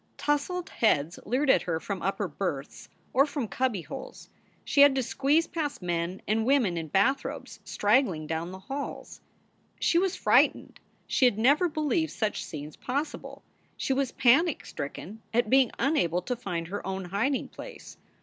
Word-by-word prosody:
Tousled 295 Hz, +5 st, -1 dB
heads 170 Hz, -7 st, +1 dB
leered 260 Hz, +5 st, +3 dB
at -, -, +4 dB
her 165 Hz, -2 st, -2 dB
from 195 Hz, +1 st, -5 dB
upper 195 Hz, +1 st, -1 dB
berths 150 Hz, -4 st, -5 dB, 0.2 s
or 275 Hz, +3 st, +5 dB
from 280 Hz, -5 st, -3 dB
cubbyholes. 200 Hz, -, -4 dB, 0.4 s
She 280 Hz, -, +3 dB
had 285 Hz, -1 st, +7 dB
to 265 Hz, -, +1 dB
squeeze 280 Hz, +7 st, +2 dB
past 310 Hz, -4 st, -3 dB
men 175 Hz, +1 st, -2 dB
and 220 Hz, +1 st, +1 dB
women 245 Hz, -8 st, +2 dB
in 165 Hz, -1 st, -3 dB
bathrobes 200 Hz, -, 0 dB
straggling 205 Hz, -, +2 dB
down 165 Hz, +3 st, -3 dB
the 190 Hz, -, -7 dB
halls. 270 Hz, +9 st, -6 dB, 0.6 s
She 340 Hz, -, +3 dB
was 380 Hz, 0 st, 0 dB
frightened. -, -, +2 dB, 0.3 s
She 260 Hz, -, +2 dB
had 245 Hz, -5 st, +3 dB
never 285 Hz, +10 st, +4 dB
believed 310 Hz, +1 st, 0 dB
such 215 Hz, -2 st, -2 dB
scenes 150 Hz, 0 st, -8 dB
possible. 285 Hz, +4 st, -4 dB, 0.3 s
She 270 Hz, -, 0 dB
was 265 Hz, -1 st, 0 dB
panic 280 Hz, +6 st, +3 dB
stricken 185 Hz, +9 st, -7 dB
at 240 Hz, -2 st, +2 dB
being 265 Hz, -2 st, +5 dB
unable 180 Hz, -, +1 dB
to 250 Hz, +6 st, -2 dB
find 175 Hz, -8 st, -4 dB
her 205 Hz, +2 st, -4 dB
own 190 Hz, -1 st, -3 dB
hiding 220 Hz, +10 st, -1 dB
place. -, -, -11 dB
235 Hz, 160 wpm, -28 LUFS, 180-280 Hz, 0.6 s, had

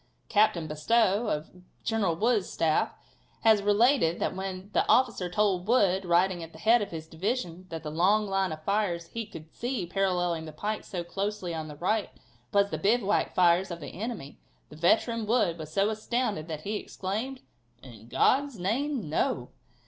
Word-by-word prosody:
Captain 205 Hz, -6 st, +3 dB
Bestow, 205 Hz, +8 st, +2 dB
of 150 Hz, -4 st, -2 dB, 0.3 s
General 215 Hz, -7 st, +1 dB
Wood's 220 Hz, +1 st, +1 dB
staff, 160 Hz, -2 st, +1 dB, 0.5 s
has 220 Hz, -2 st, +5 dB
related 205 Hz, -, +3 dB
that -, -, -1 dB
when 190 Hz, +1 st, -5 dB
the -, -, +3 dB
officer 235 Hz, -8 st, +3 dB
told 190 Hz, 0 st, +1 dB
Wood, 195 Hz, -6 st, +3 dB
riding 175 Hz, +1 st, +2 dB
at 165 Hz, 0 st, -9 dB
the -, -, -12 dB
head 225 Hz, +7 st, +4 dB
of 205 Hz, -, -3 dB
his 160 Hz, -1 st, -6 dB
division, 180 Hz, +1 st, -3 dB
that 165 Hz, -1 st, -6 dB
the 150 Hz, -, -5 dB
long 195 Hz, +7 st, +3 dB
line 195 Hz, -2 st, 0 dB
of 155 Hz, 0 st, -7 dB
fires 180 Hz, -4 st, -1 dB
he 230 Hz, -2 st, -5 dB
could 160 Hz, -7 st, -11 dB
see 240 Hz, -6 st, -3 dB
paralleling 175 Hz, -3 st, 0 dB
the 155 Hz, -, -7 dB
pike 210 Hz, +8 st, -4 dB
so 175 Hz, -2 st, -4 dB
closely 195 Hz, 0 st, -3 dB
on 160 Hz, -1 st, -4 dB
the 150 Hz, -, -8 dB
right 190 Hz, +5 st, 0 dB, 0.4 s
was 200 Hz, 0 st, +3 dB
the -, -, -2 dB
bivouac 210 Hz, 0 st, +1 dB
fires 180 Hz, +1 st, +4 dB
of 170 Hz, -1 st, -5 dB
the 150 Hz, -, -8 dB
enemy, 220 Hz, -, -5 dB, 0.3 s
the -, -, -12 dB
veteran 220 Hz, +7 st, +2 dB
Wood 210 Hz, -8 st, +2 dB
was 155 Hz, -1 st, -7 dB
so 200 Hz, +5 st, +2 dB
astounded 215 Hz, -6 st, -2 dB
that 155 Hz, -2 st, -5 dB
he 210 Hz, +5 st, -2 dB
exclaimed: 220 Hz, +9 st, -4 dB, 0.4 s
"In 115 Hz, -4 st, -13 dB
God's 275 Hz, -, +2 dB
name, 235 Hz, -, -1 dB
no!" 130 Hz, -4 st, -1 dB
195 Hz, 175 wpm, -28 LUFS, 170-215 Hz, 0.5 s, has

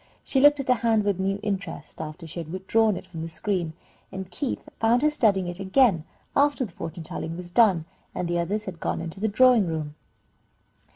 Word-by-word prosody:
She 270 Hz, -, +1 dB
looked 290 Hz, +1 st, +6 dB
at 275 Hz, -, -3 dB
her 255 Hz, -, +6 dB
hand 225 Hz, -2 st, +2 dB
with 200 Hz, -2 st, 0 dB
a -, -, 0 dB
new 195 Hz, +1 st, 0 dB
interest 200 Hz, -6 st, -4 dB
after 160 Hz, +2 st, -7 dB
she 160 Hz, +2 st, -7 dB
had 160 Hz, -1 st, -6 dB
withdrawn 195 Hz, +3 st, +2 dB
it -, -, -8 dB
from 165 Hz, -2 st, -8 dB
the 165 Hz, -, -4 dB
screen, 170 Hz, -1 st, -2 dB, 0.4 s
and 190 Hz, -1 st, -7 dB
Keith 255 Hz, +8 st, -3 dB
found 235 Hz, +4 st, +3 dB
her 300 Hz, -, +4 dB
studying 205 Hz, -10 st, +2 dB
it 175 Hz, +1 st, -5 dB
again 195 Hz, -, +3 dB, 0.3 s
after 285 Hz, -2 st, +3 dB
the 205 Hz, -, -11 dB
fortune 165 Hz, +1 st, -7 dB
telling 165 Hz, +1 st, -5 dB
was 175 Hz, -1 st, -8 dB
done, 190 Hz, -6 st, +4 dB, 0.3 s
and 180 Hz, -, -2 dB
the 175 Hz, 0 st, 0 dB
others 205 Hz, +5 st, -1 dB
had 180 Hz, -4 st, -7 dB
gone -, -, -2 dB
into 165 Hz, +2 st, -6 dB
the 220 Hz, -, +1 dB
drawing 230 Hz, -1 st, +5 dB
room. 155 Hz, -2 st, -3 dB
190 Hz, 215 wpm, -25 LUFS, 170-225 Hz, 0.4 s, looked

